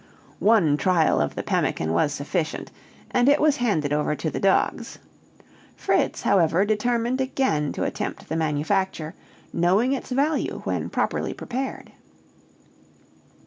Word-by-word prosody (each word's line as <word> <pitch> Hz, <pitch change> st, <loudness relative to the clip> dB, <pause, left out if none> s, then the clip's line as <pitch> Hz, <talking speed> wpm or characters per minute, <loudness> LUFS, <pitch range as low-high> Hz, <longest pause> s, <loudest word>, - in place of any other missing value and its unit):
One 200 Hz, -9 st, +4 dB
trial 160 Hz, -, +2 dB
of 75 Hz, -, -2 dB
the -, -, -3 dB
pemmican 80 Hz, +1 st, 0 dB
was 115 Hz, -, +2 dB
sufficient, 155 Hz, +3 st, -3 dB, 0.4 s
and 245 Hz, +2 st, +3 dB
it 285 Hz, -, +4 dB
was 300 Hz, -1 st, +3 dB
handed 160 Hz, -, 0 dB
over 150 Hz, 0 st, 0 dB
to 155 Hz, +2 st, -3 dB
the -, -, -3 dB
dogs. 195 Hz, -1 st, +1 dB, 0.8 s
Fritz, -, -, 0 dB
however, 180 Hz, 0 st, +3 dB
determined 235 Hz, +4 st, 0 dB
again 260 Hz, -, 0 dB
to -, -, -3 dB
attempt -, -, -4 dB
the 160 Hz, -, -3 dB
manufacture, 160 Hz, +2 st, -1 dB, 0.4 s
knowing 195 Hz, +10 st, +2 dB
its 275 Hz, -, -4 dB
value 285 Hz, +4 st, 0 dB
when -, -, -2 dB
properly -, -, -1 dB
prepared. 260 Hz, +2 st, -5 dB
190 Hz, 130 wpm, -24 LUFS, 155-245 Hz, 0.8 s, One